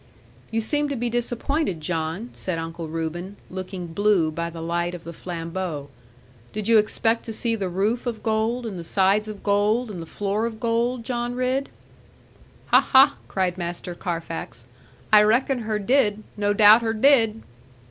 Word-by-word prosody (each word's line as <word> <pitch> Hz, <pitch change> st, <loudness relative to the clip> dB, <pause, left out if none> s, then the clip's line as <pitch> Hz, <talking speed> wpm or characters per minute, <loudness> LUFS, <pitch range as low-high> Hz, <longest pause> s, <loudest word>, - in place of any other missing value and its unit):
'You 225 Hz, 0 st, 0 dB
seem 295 Hz, +6 st, 0 dB
to 280 Hz, -, -2 dB
be 240 Hz, -1 st, -2 dB
disappointed, 240 Hz, -, -1 dB
John,' 165 Hz, +7 st, -3 dB
said 185 Hz, -3 st, -4 dB
Uncle 165 Hz, 0 st, -5 dB
Reuben, 165 Hz, +4 st, -4 dB, 0.2 s
looking 185 Hz, -1 st, -5 dB
blue 200 Hz, -4 st, +2 dB
by 170 Hz, +2 st, -3 dB
the 165 Hz, 0 st, -9 dB
light 170 Hz, +1 st, -2 dB
of 170 Hz, -, -10 dB
the 170 Hz, -, -8 dB
flambeaux; 165 Hz, -3 st, -5 dB, 0.6 s
'did 215 Hz, -1 st, -3 dB
you 230 Hz, -1 st, +6 dB
expect 225 Hz, +2 st, +1 dB
to 225 Hz, -, -4 dB
see 230 Hz, +1 st, -1 dB
the 195 Hz, -4 st, -3 dB
roof 210 Hz, +7 st, -1 dB
of 230 Hz, -2 st, -4 dB
gold, 225 Hz, +2 st, 0 dB
and 200 Hz, -5 st, -5 dB
the -, -, -6 dB
sides 195 Hz, +4 st, +2 dB
of 210 Hz, -2 st, -8 dB
gold, 210 Hz, +3 st, +1 dB
and 180 Hz, -4 st, -6 dB
the 165 Hz, -, -8 dB
floor 205 Hz, +5 st, -1 dB
of 220 Hz, -2 st, -7 dB
gold, 235 Hz, +1 st, 0 dB
John 240 Hz, 0 st, -3 dB
Ridd?' 255 Hz, +2 st, 0 dB, 1.0 s
'Ha, -, -, +7 dB
ha!' 270 Hz, +2 st, +5 dB
cried 185 Hz, -1 st, -1 dB
Master 175 Hz, +1 st, -4 dB
Carfax; 165 Hz, -, -5 dB, 0.5 s
'I 210 Hz, -, +9 dB
reckon 245 Hz, +5 st, +2 dB
her 220 Hz, -2 st, -2 dB
did; 215 Hz, -1 st, +2 dB
no 205 Hz, -1 st, +1 dB
doubt 210 Hz, +2 st, +7 dB
her 225 Hz, -1 st, 0 dB
did.' 225 Hz, -2 st, +3 dB
210 Hz, 170 wpm, -24 LUFS, 175-230 Hz, 1.0 s, I